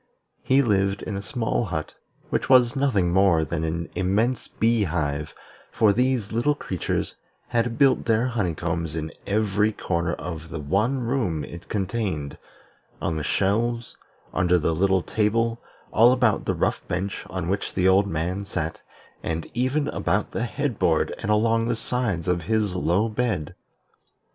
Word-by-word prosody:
He 135 +2 +3
lived 100 -3 +1
in 105 - -4
a 100 - -3
small 115 +3 -1
hut, 80 -5 -4 0.4
which - - -1
was 125 -2 +6
nothing 105 -11 +2
more 95 -4 +4
than 80 0 -3
an 80 +1 -2
immense 105 +7 0
bee 115 -1 +1
hive, 75 -3 -2 0.4
for 105 -2 +4
these 125 -2 +1
little 120 +6 +2
creatures 95 - -3 0.4
had 115 -1 0
built 135 -2 +4
their 115 +1 +2
honeycombs 85 -8 -2
in 80 -1 -3 0.2
every 105 0 +2
corner 85 -4 -1
of 80 0 -7
the 85 - -5
one 100 - 0
room 115 - -1
it 85 - -11
contained, 95 -8 -2 0.6
on 85 - -1
the 80 - -2
shelves, 115 - 0 0.4
under 90 -1 +3
the 80 0 +1
little 95 +2 +2
table, 115 +2 0 0.3
all 115 +3 +7
about 125 -4 +2
the - - 0
rough - - 0
bench 95 +1 -3
on 90 -3 -3
which 100 +2 -2
the 95 0 +3
old 95 +2 +4
man 90 +3 -2
sat, 85 -5 -4 0.4
and 80 0 -3
even 130 +4 0
about 100 +1 -1
the 115 - -1
head 135 -2 -3
board 80 -2 +2
and - - -4
along 115 +2 +3
the 120 - +1
sides 115 -7 -2
of 90 -1 +1
his 105 +1 0
low 90 +4 +1
bed. 110 -9 -2
100 Hz, 160 wpm, -24 LUFS, 85-115 Hz, 0.6 s, all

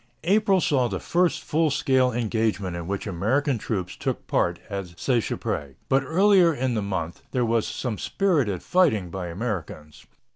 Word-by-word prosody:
April 195 +2 +3
saw 135 -7 +2
the - - -3
first 175 0 +1
full 160 +1 +1
scale 130 -3 +2
engagement 110 -5 -1
in 85 -1 -5
which 100 0 -3
American 115 - 0
troops 95 -5 -3
took - - -3
part 85 -1 +1
at 95 -4 -6
Seicheprey, 75 - -1
but 135 0 +4
earlier 185 +2 +4
in 130 -4 -1
the 110 - 0
month 90 -4 -4
there 125 -2 0
was 115 -1 +1
some 120 -5 -4
spirited 145 - 0
fighting 110 - +2
by 95 -1 -4
Americans. 85 -6 -5
115 Hz, 155 wpm, -25 LUFS, 95-145 Hz, -, but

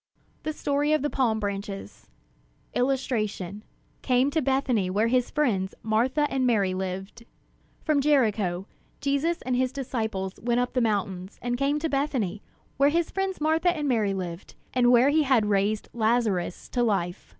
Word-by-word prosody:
THE 310 - -2
STORY 290 0 0
OF 310 - +1
THE 295 - -1
PALM 230 -5 +1
BRANCHES 200 -1 -5 0.6
[Illustration: 215 -7 -1 0.4
Came 255 +2 +2
to 315 +2 +1
Bethany 260 -7 +1
where 210 +5 +1
his 250 0 +2
friends 205 -11 0
Martha 250 +7 +2
and 260 -1 +2
Mary 200 -6 +2
lived] 190 +4 -5 0.6
From 305 -3 +2
Jericho, 215 -11 +2 0.3
Jesus 280 +5 0
and 255 0 0
his 255 0 +1
disciples 220 -8 -3
went 240 +1 +1
up 245 0 -1
the 250 - +1
mountains, 195 -4 -2
and 245 0 0
came 280 +3 +1
to 310 +2 -1
Bethany, 265 - -1 0.4
where 280 +2 +5
his 335 +2 0
friends 385 -1 -2
Martha 320 +3 +2
and 295 -1 -1
Mary 215 -6 +1
lived, 175 -2 -6 0.2
and 245 -1 +4
where 250 +3 +6
he 310 +2 +3
had 260 -7 +3
raised 205 +1 +1
Lazarus 220 -6 0
to 245 - -1
life. 195 -6 -1
245 Hz, 160 wpm, -26 LUFS, 200-275 Hz, 0.6 s, where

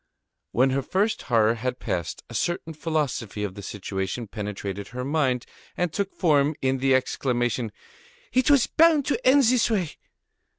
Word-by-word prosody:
When 130 +3 +3
her 135 +1 +1
first 200 - 0
horror 115 -2 +3
had 125 +2 -3
passed 85 - -3
off, - - -19
a - - -7
certain 175 -1 -2
philosophy 145 - -2
of 100 -2 -3
the 100 - -9
situation 95 +3 -4
penetrated 100 -2 -5
her 125 +1 -5
mind, 135 -4 0 0.3
and 175 -2 0
took 200 -1 -1
form 150 -3 +3
in 130 0 0
the 135 0 +3
exclamation: 120 -3 0 0.6
"It 255 +1 +3
was 280 -4 +5
bound 315 -3 +4
to 260 -4 -1
end 275 +2 +6
in - - +5
this 250 -2 +3
way!" 190 -8 -1
130 Hz, 170 wpm, -25 LUFS, 115-180 Hz, 0.6 s, end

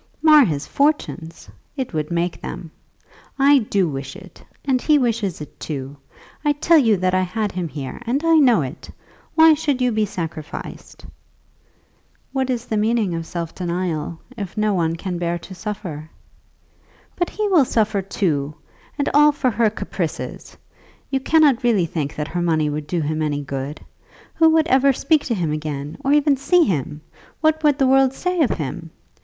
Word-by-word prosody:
"Mar 305 -2 +8
his 150 -6 -2
fortunes! 280 - -1 0.3
It 260 -7 -4
would 155 -1 -2
make 170 0 -2
them. 165 - -7 0.7
I 280 0 +5
do 200 -5 0
wish 135 -2 -5
it, 190 -2 -14 0.2
and 260 -3 +1
he 305 -1 +4
wishes 225 - -1
it 150 - -11
too. 140 -2 -5 0.5
I 295 -1 +3
tell 320 +2 +4
you 225 -7 +3
that 185 0 0
I 185 - +3
had 205 +3 -2
him 180 -2 -3
here, 140 - -7
and 270 +6 0
I 330 -1 +4
know 245 - +4
it. 130 - -8 0.5
Why 320 0 +7
should 290 -3 -1
you 250 -1 +2
be 215 -1 0
sacrificed?" 165 -4 -7 1.3
"What 265 -1 -1
is 245 -2 -2
the 220 - -2
meaning 215 -3 +1
of 165 0 -4
self 170 -2 -5
denial, 170 -3 -3 0.2
if 205 -3 -7
no 210 -1 +1
one 165 -3 0
can 180 0 -4
bear 175 0 -1
to 180 +3 -11
suffer?" 180 -6 -6 1.1
"But 350 - -1
he 425 0 -2
will 345 -7 +5
suffer 215 -4 0
too, 155 -7 -2 0.4
and 285 - -1
all 295 +1 +6
for 275 -3 0
her 220 +1 +2
caprices! 210 - -5 0.5
You 270 - +1
cannot 285 -3 +3
really 225 -8 +2
think 155 -3 -4
that 150 0 -4
her 175 - -2
money 160 -3 +1
would 150 0 -5
do 175 0 -1
him 155 +1 -2
any 145 -2 -1
good. 140 +2 -5 0.5
Who 325 -1 +5
would 320 -1 +3
ever 270 +1 +4
speak 310 +3 +1
to 235 - -1
him 170 -6 -1
again, 150 - -5
or 275 - +1
even 290 -1 +4
see 345 +6 +3
him? 150 - -2 0.4
What 315 0 +2
would 295 -2 +4
the 270 - +3
world 265 0 +4
say 360 +4 -1
of 270 - +3
him? 160 +2 -4
200 Hz, 180 wpm, -21 LUFS, -, 1.3 s, Mar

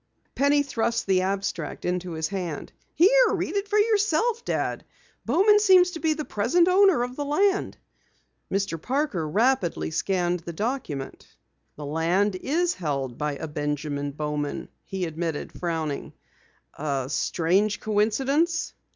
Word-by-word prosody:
Penny 285 +1 +3
thrust 235 -3 -1
the 190 -1 +2
abstract 190 -3 -3
into 180 -1 -2
his 160 0 -2
hand. 180 -6 -4 0.2
"Here, - - +5
read - - -2
it 400 0 -1
for 420 - +1
yourself, 430 +1 +2
Dad. - - -2 0.4
Bowman 390 - +5
seems 370 -3 +5
to 330 - -6
be 320 -1 +2
the 305 -1 -4
present 255 +12 +2
owner 370 -7 +5
of 250 +1 -5
the 290 - -3
land." 385 +8 +1 0.7
Mr. 195 -5 -1
Parker 250 - -1
rapidly 215 - +1
scanned 180 +1 0
the 170 +1 -8
document. 205 - -4 0.5
"The 150 - -7
land 170 +7 +1
is 330 - 0
held 140 -7 -3
by 150 -1 -1
a 160 - -5
Benjamin 145 -1 -3
Bowman," 150 0 -4 0.2
he 190 -2 -3
admitted, 160 -1 -4
frowning. 160 -4 -3 0.7
"A 140 -3 -1
strange 185 +8 +1
coincidence." 270 +11 +1
200 Hz, 135 wpm, -25 LUFS, -, 0.7 s, Here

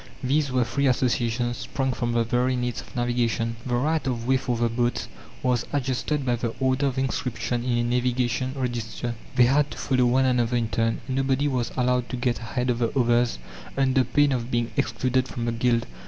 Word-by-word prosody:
These 140 +2 +1
were 125 -1 +2
free 140 +4 0
associations 120 -1 +1
sprung 130 0 -2
from 120 -1 -2
the 115 0 +2
very 125 +2 +1
needs 125 -4 -2
of - - -16
navigation. 120 -1 0
The 120 - 0
right 150 +3 0
of 120 -3 -2
way 130 +1 +3
for 125 -2 -1
the 120 0 +2
boats 120 +1 -1 0.4
was 125 -2 +1
adjusted 135 +1 -1
by 120 -1 +1
the 115 -1 -3
order 130 +1 +2
of 135 -1 -3
inscription 125 -2 -1
in 125 -1 0
a 120 - +1
navigation 125 +1 0
register; 120 -2 -3 0.2
they 125 - +6
had 140 +3 +3
to - - -9
follow 130 -2 +2
one 130 +2 +3
another 125 -1 +2
in 115 -2 -1
turn. 115 0 0
Nobody 135 +2 +1
was 125 -4 -1
allowed 125 -1 +1
to 125 - -3
get 120 -1 0
ahead 125 +2 -1
of 120 - -2
the 120 +3 0
others 120 - +2 0.4
under 135 -1 +3
pain 145 +4 +2
of 120 -2 -2
being 120 -1 0
excluded 130 +2 0
from 120 -2 -4
the 120 - 0
guild. 115 0 +1
125 Hz, 200 wpm, -25 LUFS, 120-130 Hz, 0.4 s, they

